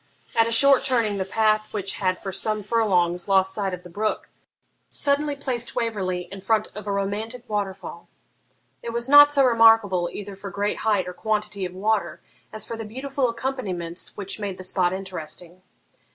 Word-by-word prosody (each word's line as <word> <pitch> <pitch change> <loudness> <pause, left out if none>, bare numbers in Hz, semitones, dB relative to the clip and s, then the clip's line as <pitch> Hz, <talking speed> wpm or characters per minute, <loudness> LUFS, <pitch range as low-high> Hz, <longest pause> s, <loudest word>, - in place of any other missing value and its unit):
At 225 0 +4
a - - -2
short 275 +4 +5
turning 225 -6 0
the 190 - -1
path, 215 +1 +1
which 195 -2 -3
had 185 -2 0
for 195 - -6
some 215 +2 -1
furlongs 185 -5 +1
lost 190 -1 +3
sight 195 -2 -2
of 180 -1 -7
the - - -10
brook, 215 +4 -2 0.6
suddenly 285 +1 0
placed 250 -4 -3
Waverley 190 -6 -1
in 195 -1 -8
front 215 +2 +1
of 210 0 -9
a - - -1
romantic 215 +5 -3
waterfall. 195 -4 -4 0.7
It 235 - -5
was 235 +1 -1
not 290 +1 +9
so 280 -2 +4
remarkable 225 -7 +5
either 200 -1 -7
for 200 +1 -8
great 200 +2 -2
height 205 -4 +1
or 180 - -5
quantity 210 -1 -2
of 180 - -6
water 190 -5 -1 0.3
as 215 -2 -4
for 230 - -5
the 225 - -6
beautiful 260 +4 -2
accompaniments 215 -9 -4
which 200 +1 -4
made 200 -3 -4
the 185 - -8
spot 185 -1 +2
interesting. 180 -2 -7
210 Hz, 180 wpm, -24 LUFS, 190-230 Hz, 0.7 s, not